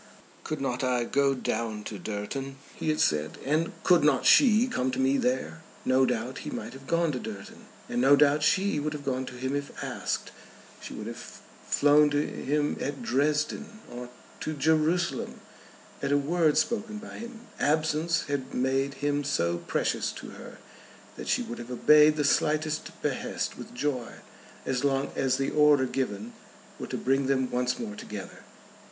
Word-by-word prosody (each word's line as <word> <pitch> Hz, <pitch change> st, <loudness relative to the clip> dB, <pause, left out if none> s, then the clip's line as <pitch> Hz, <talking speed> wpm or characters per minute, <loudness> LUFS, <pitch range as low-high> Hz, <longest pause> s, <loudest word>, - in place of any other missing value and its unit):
"Could 155 Hz, -, -4 dB
not 130 Hz, -2 st, -2 dB
I 125 Hz, -2 st, +1 dB
go 140 Hz, +2 st, +2 dB
down 110 Hz, -4 st, -2 dB
to 105 Hz, -1 st, -6 dB
Durton," 110 Hz, +8 st, -4 dB, 0.2 s
he -, -, -3 dB
had 155 Hz, -, +1 dB
said, 75 Hz, 0 st, +1 dB
"and 155 Hz, +4 st, +1 dB
could 175 Hz, -4 st, +5 dB
not 150 Hz, -, +3 dB
she 235 Hz, -3 st, +6 dB
come 130 Hz, -, -1 dB
to 130 Hz, 0 st, -3 dB
me 135 Hz, +1 st, +3 dB
there?" 125 Hz, -11 st, -1 dB, 0.2 s
No 130 Hz, 0 st, +4 dB
doubt 125 Hz, +1 st, -2 dB
he -, -, -6 dB
might -, -, -6 dB
have 135 Hz, 0 st, -12 dB
gone 170 Hz, 0 st, +2 dB
to 130 Hz, -, -3 dB
Durton, 105 Hz, -5 st, -9 dB, 0.2 s
and 120 Hz, -, -1 dB
no 135 Hz, +2 st, +7 dB
doubt 145 Hz, +1 st, +4 dB
she 190 Hz, +1 st, +2 dB
would 150 Hz, +1 st, -2 dB
have 145 Hz, -1 st, -7 dB
gone 130 Hz, -1 st, -1 dB
to -, -, -8 dB
him 130 Hz, +2 st, -2 dB
if 145 Hz, 0 st, -3 dB
asked. -, -, -3 dB, 0.5 s
She -, -, -8 dB
would -, -, -6 dB
have -, -, -8 dB, 0.3 s
flown 150 Hz, +1 st, +5 dB
to 145 Hz, 0 st, +1 dB
him 145 Hz, +1 st, -1 dB
at 140 Hz, 0 st, -3 dB
Dresden, 150 Hz, -, 0 dB
or 125 Hz, 0 st, -7 dB, 0.3 s
to 155 Hz, -, -3 dB
Jerusalem, 160 Hz, +3 st, +1 dB, 0.6 s
at -, -, -1 dB
a 145 Hz, -, +5 dB
word 155 Hz, +2 st, +2 dB
spoken 215 Hz, -2 st, 0 dB
by 210 Hz, -, -9 dB
him. 235 Hz, 0 st, -8 dB, 0.2 s
Absence 155 Hz, +2 st, +1 dB
had 140 Hz, -2 st, -4 dB
made 135 Hz, +2 st, 0 dB
him 145 Hz, 0 st, +1 dB
so 85 Hz, -11 st, 0 dB
precious -, -, -1 dB
to -, -, -9 dB
her, -, -, -11 dB, 0.6 s
that -, -, -8 dB
she -, -, +1 dB
would 120 Hz, -, -7 dB
have 120 Hz, 0 st, -8 dB
obeyed 150 Hz, +4 st, +6 dB
the 150 Hz, -, 0 dB
slightest 155 Hz, +2 st, +1 dB
behest -, -, -2 dB
with -, -, -10 dB
joy 130 Hz, -3 st, -2 dB, 0.5 s
as 130 Hz, 0 st, -1 dB
long 135 Hz, -1 st, +1 dB
as 130 Hz, -1 st, +1 dB
the 135 Hz, -, -1 dB
order 150 Hz, -3 st, +5 dB
given 120 Hz, -4 st, -3 dB, 0.5 s
were -, -, -5 dB
to -, -, -3 dB
bring 135 Hz, +1 st, +1 dB
them 130 Hz, -2 st, +1 dB
once 125 Hz, 0 st, 0 dB
more 110 Hz, -3 st, -5 dB
together. 105 Hz, -1 st, -8 dB
140 Hz, 175 wpm, -28 LUFS, 125-150 Hz, 0.6 s, no